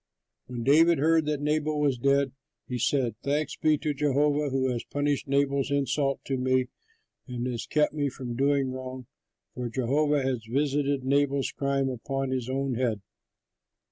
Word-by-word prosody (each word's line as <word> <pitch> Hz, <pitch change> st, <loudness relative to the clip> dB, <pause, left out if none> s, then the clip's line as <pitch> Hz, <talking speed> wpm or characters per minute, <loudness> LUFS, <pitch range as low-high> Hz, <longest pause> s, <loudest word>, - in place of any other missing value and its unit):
When 120 Hz, -2 st, -5 dB
David 165 Hz, +6 st, +5 dB
heard 160 Hz, +1 st, +3 dB
that 150 Hz, -1 st, -1 dB
Nabal 150 Hz, 0 st, 0 dB
was 140 Hz, -4 st, +1 dB
dead, 140 Hz, +1 st, +2 dB, 0.4 s
he 125 Hz, -1 st, -3 dB
said, 125 Hz, -2 st, +1 dB
"Thanks 145 Hz, +2 st, -1 dB
be 155 Hz, -1 st, +2 dB
to 150 Hz, +1 st, -2 dB
Jehovah 145 Hz, +1 st, +1 dB
who 130 Hz, 0 st, 0 dB
has 120 Hz, -2 st, -3 dB
punished 145 Hz, -1 st, -1 dB
Nabal's 140 Hz, 0 st, +1 dB
insult 140 Hz, 0 st, 0 dB
to 135 Hz, -, -1 dB
me 130 Hz, 0 st, +1 dB, 0.6 s
and 125 Hz, -1 st, -4 dB
has 120 Hz, -2 st, -3 dB
kept 150 Hz, -1 st, +2 dB
me 145 Hz, -2 st, 0 dB
from 125 Hz, -2 st, -6 dB
doing 135 Hz, 0 st, +1 dB
wrong, 130 Hz, 0 st, -7 dB, 0.5 s
for 125 Hz, -1 st, -4 dB
Jehovah 140 Hz, +4 st, +1 dB
has 130 Hz, -4 st, -1 dB
visited 140 Hz, +1 st, 0 dB
Nabal's 140 Hz, 0 st, +1 dB
crime 140 Hz, -1 st, 0 dB
upon 135 Hz, +1 st, -3 dB
his 130 Hz, -2 st, -2 dB
own 135 Hz, 0 st, -1 dB
head." 115 Hz, -4 st, -1 dB
135 Hz, 160 wpm, -27 LUFS, 130-145 Hz, 0.6 s, David